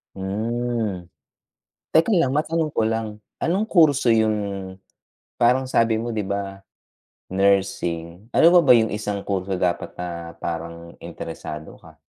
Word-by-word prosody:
Hmm. 110 -1 -2 0.9
Teka 160 +7 +4
lang, 135 -6 +2
matanong 155 +1 0
ko 110 - +1
lang, 110 -2 -3 0.2
anong 195 +6 0
kurso 145 -8 +4
yung, 110 -1 +3 1.0
parang 125 +2 +3
sabi 115 -1 +3
mo 120 - -3
di 105 - -1
ba, 100 -1 -4 0.7
nursing, 95 0 0
ano - - +4
pa - - +9
ba 130 - +6
yung 110 -1 +3
isang 105 -1 -3
kurso 95 -1 -1
dapat 90 -1 -1
na 85 -1 -5
parang 85 0 -6
interesado 80 -1 -7
ka? - - -17
105 Hz, 130 wpm, -23 LUFS, 95-120 Hz, 1.0 s, pa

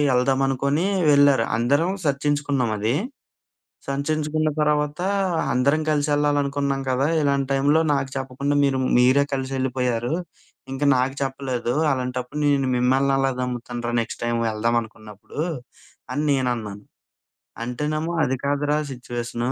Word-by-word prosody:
ఎళ్దామనుకుని 135 +5 +1 0.2
వెళ్లారు. 140 -4 +5
అందరం 145 +9 +2
సర్చించుకున్నాం 145 -3 0
అది. 110 +5 +1 0.9
సంర్చించుకున్న 155 +2 -1
తర్వాత 150 +1 0 0.5
అందరం 140 +5 +2
కలిసేళ్లాలనుకున్నాం 145 -2 +1
కదా! 130 +1 +1 0.2
"ఇలాంటి 140 -1 +1
టైంలో 145 +4 +3
నాకు 135 -1 -1
చెప్పకుండా 135 +2 -2
మీరు 135 -1 +2 0.2
మీరే 130 +3 +5
కలిసెళ్ళిపోయారు. 130 -2 -1 0.6
ఇంకా 140 +2 -2
నాకు 130 +2 +1
చెప్పలేదు. 130 -3 -2 0.2
అలాంటప్పుడు 125 +1 -3
నేను 140 -2 +2
మిమ్మల్ని 130 +2 +2
ఎలా 135 0 +2
నమ్ముతానురా? 120 -1 -4
నెక్స్ట్ 115 - -7
టైమ్ 120 0 0
ఎళ్దామనుకున్నప్పుడు" 110 0 -3 0.7
అని 150 - -1
నేనన్నాను. 120 -6 -1 0.8
అంటేనేమో 150 +7 -2
"అది 130 0 0
కాదురా 145 +1 +1
సిచ్యుయేషను" 120 0 -4
135 Hz, 105 wpm, -23 LUFS, 125-145 Hz, 0.9 s, వెళ్లారు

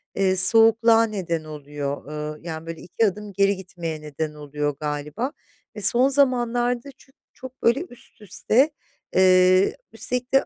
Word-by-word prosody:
eee, 190 -1 +1
soğukluğa 225 +3 +5
neden 180 -7 -3
oluyor. 145 -2 -6
Iıı, 150 0 -6
yani, 165 -1 -7
böyle, 165 -1 -7
iki 200 +6 -1
adım 205 0 -4
geri 200 +1 +2
gitmeye 170 -4 -7
neden 150 +1 -5
oluyor, 145 -1 -4
galiba. 150 - -4 0.4
E, 210 - -7
son 245 +7 +5
zamanlarda 245 -2 +1
çünkü 270 - -24 0.2
çok 260 0 -12
böyle 235 +6 +3
üst 240 -2 -17
üste, 225 - +1 0.4
eee, 185 0 +4 0.2
üstelik 250 +1 -4
de 270 - +4
190 Hz, 145 wpm, -23 LUFS, 155-235 Hz, 0.4 s, soğukluğa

